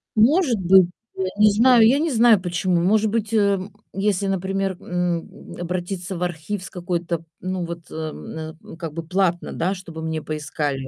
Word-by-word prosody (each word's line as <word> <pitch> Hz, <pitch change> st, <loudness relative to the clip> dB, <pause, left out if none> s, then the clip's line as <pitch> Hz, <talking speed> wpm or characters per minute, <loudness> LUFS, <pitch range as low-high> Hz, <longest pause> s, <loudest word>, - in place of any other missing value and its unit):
Может 250 Hz, -, +4 dB
быть, 185 Hz, 0 st, +6 dB, 0.3 s
я 190 Hz, -, -1 dB
не 210 Hz, -1 st, +7 dB
знаю 230 Hz, +1 st, +6 dB
я 270 Hz, +4 st, +4 dB
не 320 Hz, +1 st, 0 dB
знаю 230 Hz, -4 st, +6 dB
почему. 180 Hz, -1 st, 0 dB
Может 210 Hz, +4 st, +3 dB
быть, 220 Hz, 0 st, -2 dB
эм, 200 Hz, -2 st, +1 dB, 0.2 s
если, 200 Hz, 0 st, 0 dB
например, 195 Hz, 0 st, -1 dB
м, 180 Hz, -2 st, -3 dB
обратиться 180 Hz, +2 st, -4 dB
в 180 Hz, -, -2 dB
архив 180 Hz, +3 st, -3 dB
с -, -, -7 dB
какой-то, 175 Hz, -2 st, -3 dB, 0.2 s
ну, 185 Hz, -1 st, -3 dB
вот, 170 Hz, -1 st, -8 dB
эм, 160 Hz, 0 st, -6 dB
м, -, -, -11 dB
как 165 Hz, -3 st, -6 dB
бы, 165 Hz, +1 st, -5 dB
платно, 180 Hz, -1 st, 0 dB
да, 180 Hz, +4 st, 0 dB
чтобы 170 Hz, -4 st, -8 dB
мне 160 Hz, -1 st, -2 dB
поискали. 145 Hz, -3 st, -3 dB
185 Hz, 170 wpm, -22 LUFS, 170-205 Hz, 0.3 s, не